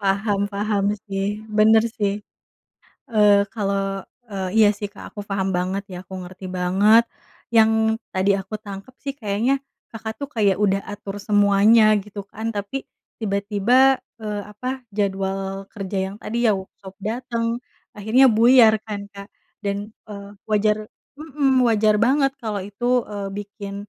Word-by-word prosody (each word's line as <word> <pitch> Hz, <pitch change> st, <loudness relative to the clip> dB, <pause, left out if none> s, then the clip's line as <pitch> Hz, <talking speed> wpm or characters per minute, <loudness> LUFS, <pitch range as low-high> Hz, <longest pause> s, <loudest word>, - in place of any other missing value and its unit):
Paham, 200 Hz, 0 st, 0 dB
paham 205 Hz, 0 st, -1 dB, 0.2 s
sih, 200 Hz, +1 st, -2 dB
bener 215 Hz, +1 st, +5 dB
sih. 210 Hz, -3 st, -1 dB, 1.0 s
Eee, 205 Hz, -2 st, +5 dB
kalau, 195 Hz, -2 st, -1 dB, 0.3 s
eee, 190 Hz, -2 st, -3 dB
iya 215 Hz, -2 st, +7 dB
sih, 205 Hz, 0 st, -6 dB
Kak 205 Hz, -, -12 dB
aku 205 Hz, -, -6 dB
paham 195 Hz, -1 st, -1 dB
banget 185 Hz, +3 st, -1 dB
ya. 180 Hz, -, -6 dB
Aku 190 Hz, +1 st, -9 dB
ngerti 185 Hz, +1 st, -9 dB
banget. 195 Hz, +5 st, +4 dB, 0.5 s
Yang 220 Hz, 0 st, +3 dB
tadi 190 Hz, +2 st, +2 dB
aku 195 Hz, +3 st, -6 dB
tangkep 205 Hz, +4 st, -10 dB
sih 275 Hz, -1 st, -3 dB
kayaknya 245 Hz, +3 st, 0 dB, 0.3 s
Kakak 220 Hz, -1 st, -6 dB
tuh 280 Hz, -1 st, -6 dB
kayak 205 Hz, -4 st, +2 dB
udah 195 Hz, -1 st, +1 dB
atur 205 Hz, -1 st, -7 dB
semuanya 205 Hz, +2 st, +4 dB, 0.2 s
gitu 205 Hz, 0 st, -8 dB
kan, 220 Hz, +3 st, -6 dB
tapi 205 Hz, +7 st, -4 dB, 0.3 s
tiba-tiba, 215 Hz, +6 st, +3 dB, 0.2 s
eee, 210 Hz, -2 st, -4 dB
apa, 255 Hz, +5 st, -5 dB
jadwal 195 Hz, -1 st, -2 dB
kerja 195 Hz, -2 st, -5 dB
yang -, -, -9 dB
tadi 235 Hz, +2 st, -1 dB
ya -, -, +5 dB
u 190 Hz, -, -6 dB, 0.2 s
sop 190 Hz, -1 st, -11 dB
dateng, 230 Hz, +2 st, -2 dB, 0.3 s
akhirnya 220 Hz, +6 st, +4 dB
buyar 230 Hz, 0 st, +6 dB
kan, 205 Hz, -2 st, -6 dB
Kak. 200 Hz, 0 st, -10 dB, 0.3 s
Dan, 200 Hz, -1 st, -1 dB, 0.3 s
eee, 200 Hz, -1 st, -8 dB, 0.2 s
wajar 215 Hz, 0 st, +1 dB, 0.3 s
mhm, 275 Hz, -4 st, +1 dB
wajar 215 Hz, -1 st, +3 dB
banget 270 Hz, +3 st, +3 dB
kalau 210 Hz, -5 st, -3 dB
itu, 240 Hz, +5 st, 0 dB
eee, 200 Hz, -1 st, -5 dB
bikin 205 Hz, -1 st, -7 dB
205 Hz, 145 wpm, -22 LUFS, 195-225 Hz, 1.0 s, iya